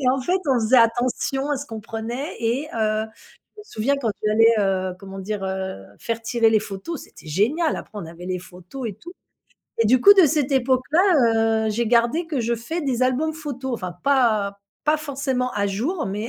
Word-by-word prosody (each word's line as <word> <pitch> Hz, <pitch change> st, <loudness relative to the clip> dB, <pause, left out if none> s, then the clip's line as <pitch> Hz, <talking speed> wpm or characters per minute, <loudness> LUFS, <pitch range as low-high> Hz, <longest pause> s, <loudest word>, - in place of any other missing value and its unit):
et 255 Hz, -, +1 dB
en 270 Hz, -, 0 dB
fait, 360 Hz, +9 st, +1 dB
on 265 Hz, -, +4 dB
faisait 230 Hz, +4 st, +3 dB
attention 250 Hz, +4 st, +1 dB
à 290 Hz, -, +1 dB
ce 285 Hz, -, -7 dB
qu'on 225 Hz, -1 st, -7 dB
prenait. 230 Hz, +7 st, -5 dB
Et 245 Hz, +6 st, -1 dB
heu, 215 Hz, -1 st, 0 dB, 0.5 s
je -, -, -10 dB
me -, -, -13 dB
souviens 275 Hz, -, -1 dB
quand 235 Hz, -6 st, -1 dB
tu 215 Hz, -, +1 dB
allais, 225 Hz, +1 st, +5 dB
heu, 190 Hz, -2 st, 0 dB
comment 195 Hz, 0 st, -9 dB
dire? 200 Hz, +1 st, -4 dB
Heu, 190 Hz, -, -4 dB
faire 230 Hz, 0 st, -4 dB
tirer 230 Hz, 0 st, +2 dB
les 215 Hz, -1 st, +3 dB
photos, 210 Hz, -, -6 dB
c'était -, -, -16 dB
génial. 255 Hz, -, +1 dB
Après, 215 Hz, -, -8 dB
on 170 Hz, -, -6 dB
avait 170 Hz, +2 st, -10 dB
les 185 Hz, 0 st, -2 dB
photos 180 Hz, +8 st, -8 dB
et 205 Hz, -, -5 dB
tout. 345 Hz, -, -12 dB, 0.7 s
Et 230 Hz, -, +3 dB
du 250 Hz, +3 st, +4 dB
coup, 405 Hz, -, +9 dB
de 380 Hz, -4 st, +7 dB
cette 290 Hz, -1 st, 0 dB
époque 260 Hz, -1 st, +2 dB
là, 225 Hz, -, +3 dB
heu, -, -, 0 dB
j'ai 235 Hz, +2 st, -1 dB
gardé 240 Hz, +8 st, +2 dB
que 300 Hz, -5 st, -2 dB
je 235 Hz, +1 st, 0 dB
fais 235 Hz, +10 st, -4 dB
des 255 Hz, -5 st, -1 dB
albums 285 Hz, +5 st, +1 dB
photos, 275 Hz, -4 st, -5 dB
enfin 185 Hz, -5 st, -5 dB
pas 220 Hz, -8 st, +2 dB, 0.3 s
pas 305 Hz, +1 st, +3 dB
forcément 270 Hz, -4 st, -2 dB
à 200 Hz, 0 st, 0 dB
jour, 255 Hz, -, -2 dB
mais 210 Hz, +4 st, -4 dB
235 Hz, 215 wpm, -22 LUFS, 210-275 Hz, 0.7 s, coup